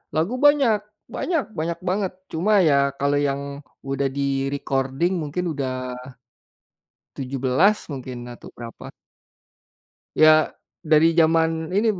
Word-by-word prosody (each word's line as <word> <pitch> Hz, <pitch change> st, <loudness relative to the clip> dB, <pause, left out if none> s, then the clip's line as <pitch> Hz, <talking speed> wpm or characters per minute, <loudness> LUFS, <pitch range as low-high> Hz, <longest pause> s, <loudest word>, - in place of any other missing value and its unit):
Lagu 170 Hz, +10 st, 0 dB
banyak 275 Hz, -5 st, +4 dB, 0.3 s
banyak 330 Hz, -6 st, -1 dB, 0.2 s
banyak 165 Hz, +1 st, -2 dB
banget 190 Hz, 0 st, -1 dB, 0.2 s
cuma 200 Hz, +6 st, +2 dB
ya 145 Hz, -, +4 dB, 0.2 s
kalau 140 Hz, +1 st, +1 dB
yang 140 Hz, 0 st, -2 dB, 0.4 s
udah 135 Hz, 0 st, -1 dB
di-recording 135 Hz, +2 st, -1 dB
mungkin 155 Hz, +5 st, -3 dB
udah 135 Hz, -2 st, -2 dB, 1.5 s
17 135 Hz, +9 st, +2 dB
mungkin 130 Hz, -3 st, -6 dB
atau 120 Hz, -, -12 dB
berapa. 115 Hz, -1 st, -10 dB, 1.2 s
Ya 155 Hz, 0 st, +5 dB, 0.3 s
dari 160 Hz, +1 st, +4 dB
zaman 160 Hz, 0 st, +2 dB
ini 210 Hz, +4 st, +2 dB
b -, -, -8 dB
155 Hz, 110 wpm, -23 LUFS, 135-180 Hz, 1.5 s, Ya